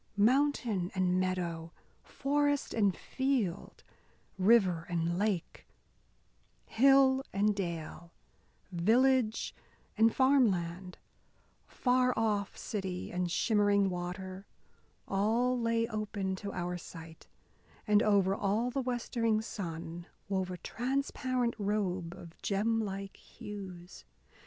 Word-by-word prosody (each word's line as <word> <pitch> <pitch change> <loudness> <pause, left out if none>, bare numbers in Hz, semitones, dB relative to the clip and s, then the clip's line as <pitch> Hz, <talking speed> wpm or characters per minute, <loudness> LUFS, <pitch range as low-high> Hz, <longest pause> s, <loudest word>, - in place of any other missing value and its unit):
Mountain 230 -5 +2
and 185 -1 +2
meadow, 175 -3 -2 0.3
forest 290 0 0
and 200 -5 +2
field, 260 -10 -2 0.6
river 185 -5 +4
and 170 0 -1
lake, 205 -5 -2 1.0
hill 270 +1 +5
and 210 +1 +2
dale, 170 -2 -5 0.6
village 230 +5 +2 0.4
and 225 +1 +5
farmland, 190 -10 +2 0.7
far 250 0 +2
off 210 -3 0
city 190 -4 -4
and 180 0 -1
shimmering 205 0 +2
water 185 +2 -6 0.6
all 225 +6 +1
lay 230 0 +1
open 205 -3 -3
to 200 +1 -6
our 175 0 -3
sight, 165 -1 -11 0.6
and 210 -1 +4
over 200 -3 +3
all 210 +5 0
the 270 +2 -1
westering 235 -3 0
sun 170 -5 -6 0.2
wove 190 -2 -1
a 180 - -5
transparent 255 +1 -1
robe 190 -4 -1
of 165 -1 -12
gem 220 +3 +1
like 195 -1 -5
hues. 185 - -10
200 Hz, 100 wpm, -32 LUFS, 180-235 Hz, 1.0 s, hill